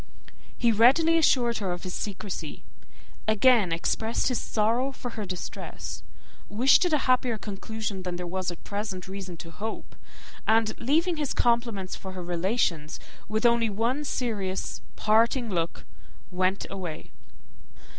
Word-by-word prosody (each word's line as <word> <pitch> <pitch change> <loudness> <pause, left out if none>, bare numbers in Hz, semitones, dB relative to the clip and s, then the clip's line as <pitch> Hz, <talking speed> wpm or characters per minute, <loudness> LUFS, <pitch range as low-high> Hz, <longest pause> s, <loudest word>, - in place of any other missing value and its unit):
He 235 -1 +3
readily 280 +10 +5
assured 240 -6 +3
her 195 -4 -2
of 175 - -5
his 185 -1 -5
secrecy, 205 -1 -5 0.6
again 220 -3 +5
expressed 220 +9 0
his 250 - 0
sorrow 230 +5 +1
for 245 -2 -7
her 215 -3 -5
distress, 180 -1 -6 0.5
wished 245 - +5
it 355 - +1
a - - +6
happier 255 -3 +2
conclusion 210 -1 -5
than 180 -1 -4
there 180 0 -4
was 185 +1 -2
at 175 - -7
present 200 -3 -4
reason 190 -2 -6
to 165 +1 -9
hope, 220 +5 -6 0.5
and, 220 0 +3
leaving 325 +7 +2
his 295 -3 -2
compliments 235 -6 +1
for 190 -1 -8
her 185 -1 -6
relations, 175 -3 0 0.3
with 220 +2 0
only 235 -1 +4
one 235 +8 0
serious 210 -9 -2
parting 230 +2 +3
look, 170 -2 -2 0.5
went 185 +2 +1
away. 180 -5 -6
215 Hz, 140 wpm, -27 LUFS, 185-240 Hz, 0.6 s, a